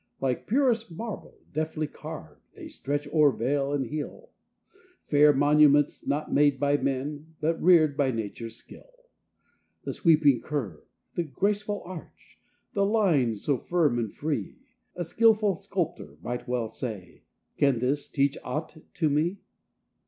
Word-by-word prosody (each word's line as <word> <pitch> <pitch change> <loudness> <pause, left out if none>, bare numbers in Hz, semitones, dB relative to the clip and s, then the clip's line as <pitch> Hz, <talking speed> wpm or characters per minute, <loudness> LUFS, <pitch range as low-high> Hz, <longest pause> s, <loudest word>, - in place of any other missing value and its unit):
Like 130 -2 -2
purest 235 -2 +2
marble, 220 +5 -7 0.2
deftly 155 +1 -2
carv'd, 150 - -9
They - - -9
stretch 145 +1 -3
o'er 150 -2 +5
vale 135 +4 -1
and 140 -2 0
hill, 155 - -6 0.7
Fair 150 0 +6
monuments, 145 +1 +4
not 150 +2 -1
made 145 -2 +4
by 145 +1 +2
man, 145 +4 -3
But 160 +2 0
rear'd 160 -5 +5
by 140 -2 +2
nature's 115 0 -5
skill. 310 - -14 0.9
The - - -4
sweeping 150 - +4
curve, 115 - -4 0.3
the - - -1
graceful 205 - -1
arch, 180 -2 -11 0.3
The 200 -4 +2
line 180 - +2
so 130 +5 -1
firm 155 -9 +1
and 110 -3 -2
free; 150 -1 -3 0.4
A 175 - -2
skilful 215 +2 +3
sculptor 185 -4 -4
well 125 0 -2
might 110 - -6
say: 105 -8 -7 0.4
"Can 140 -3 +4
this 135 +5 -1
teach 140 0 +1
aught 155 +1 -4 0.2
to 160 - +1
me?" 155 +6 +1
150 Hz, 135 wpm, -27 LUFS, 135-175 Hz, 0.9 s, Fair